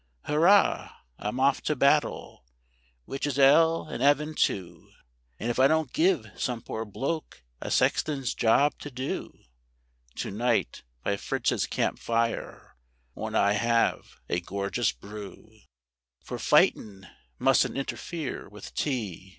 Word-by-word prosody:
Hurrah! 175 +7 +3 0.2
I'm 105 +5 -3
off 135 +1 +3
to 150 - -1
battle, 140 - +1 0.6
which 135 +2 -3
is 140 - -2
'ell 160 +4 +5
and 125 - -6
'eaven 145 +3 +3
too; 90 - -2 0.5
And 120 - -1
if 120 - -3
I 135 - +7
don't 160 -3 0
give 165 - +2
some 120 -2 -3
poor 110 0 -5
bloke 135 - -4 0.2
a - - -4
sexton's 140 -5 +1
job 140 +6 +2
to 145 - -7
do, 130 0 -5 0.7
To - - -4
night, 115 - 0 0.2
by 100 - 0
Fritz's - - -1
campfire, 115 0 -2 0.4
won't - - -5
I 100 +1 +3
'ave 115 +2 +1 0.2
a 85 - 0
gorgeous 100 +2 -1
brew 105 - -11 0.6
(For - - -6
fightin' 95 -3 +2 0.3
mustn't - - +2
interfere 140 - -5
with 105 0 -11
Tea). 110 - -3
125 Hz, 125 wpm, -27 LUFS, 105-145 Hz, 0.7 s, I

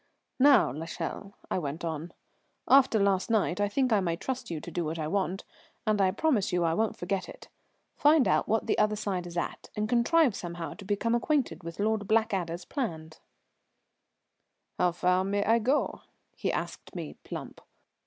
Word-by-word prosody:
"Now, 270 - +6
l'Echelle," 165 +6 -6 0.2
I - - +1
went 155 +1 -4
on, 160 +1 -4 0.6
"after 265 -4 +6
last 200 0 +2
night 205 -4 +1
I 205 - +2
think 255 +2 +1
I 210 - +4
may 170 -3 0
trust 255 +8 -4
you 165 -2 -3
to 170 - -9
do 175 - -1
what 160 +1 -3
I 155 -1 -2
want, 190 +1 -1 0.4
and 215 -2 +2
I 190 - +4
promise 215 -1 +1
you 175 -1 +1
I 165 -1 +2
won't 220 +4 0
forget 185 +1 -2
it. - - -12 0.5
Find 295 -5 +5
out - - +2
what 225 0 +1
the - - +1
other 210 0 +3
side 190 -4 -3
is 175 0 -7
at, - - -4
and 210 0 -1
contrive 245 +4 +3
somehow 170 -1 -5
to 205 - -12
become 205 +4 0
acquainted 260 - 0
with 170 +2 -8
Lord 210 -1 0
Blackadder's 195 -6 0
plans." 160 - -4 1.6
"How 180 - +3
far 180 +1 +2
may 200 +1 0
I 230 +2 +4
go?" 260 +6 0 0.3
he - - -1
asked - - -5
me - - -5
plump. - - -8
200 Hz, 180 wpm, -29 LUFS, 175-225 Hz, 1.6 s, Now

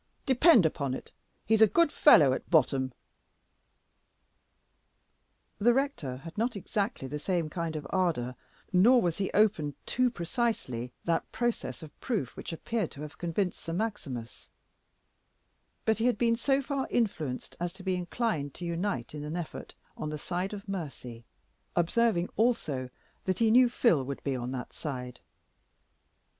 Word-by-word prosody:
Depend 265 - +6
upon 140 -4 0
it, - - -9 0.3
he's 220 0 +3
a 220 - +9
good 335 - +3
fellow 150 - +7
at - - -5
bottom." 135 -6 +3 2.7
The 235 +3 +4
rector 265 - -1
had 165 +6 -10
not 235 +1 0
exactly 200 - -2
the 150 +3 -4
same 165 -1 -1
kind 165 -2 -3
of 150 -2 -4
ardor, 165 -10 0 0.4
nor 230 +8 +6
was 175 -5 0
he 195 - 0
open 190 -10 +2
too 255 0 +2
precisely 170 - -2
that 165 -1 -1
process 235 - -2
of 155 - -13
proof 210 - -2
which - - -7
appeared 210 +3 -2
to 140 - -9
have 150 +1 -9
convinced 175 +2 -1
Sir 165 - -5
Maximus; 170 - -4 1.4
but 220 0 +2
he 225 - +1
had 245 - +2
been 230 0 +3
so 270 +3 +1
far 275 -1 -2
influenced 160 - -1
as 175 0 -2
to 190 0 -11
be 190 0 0
inclined 175 - -2
to 175 - -6
unite 170 - -2
in 150 -1 -5
an 150 +3 -4
effort 170 -3 -6 0.2
on 155 - -4
the 150 - -4
side 180 +5 -3
of 205 -1 -7
mercy, 135 -11 -6 0.5
observing 175 +1 +2
also 155 - +1 0.4
that 185 -1 0
he 225 -1 +3
"knew 250 +1 +6
Phil 230 - +3
would 140 +1 -6
be 140 -2 -1
on 125 -1 -3
that 130 -2 -5
side." 125 -4 -6
175 Hz, 155 wpm, -29 LUFS, 145-225 Hz, 2.7 s, a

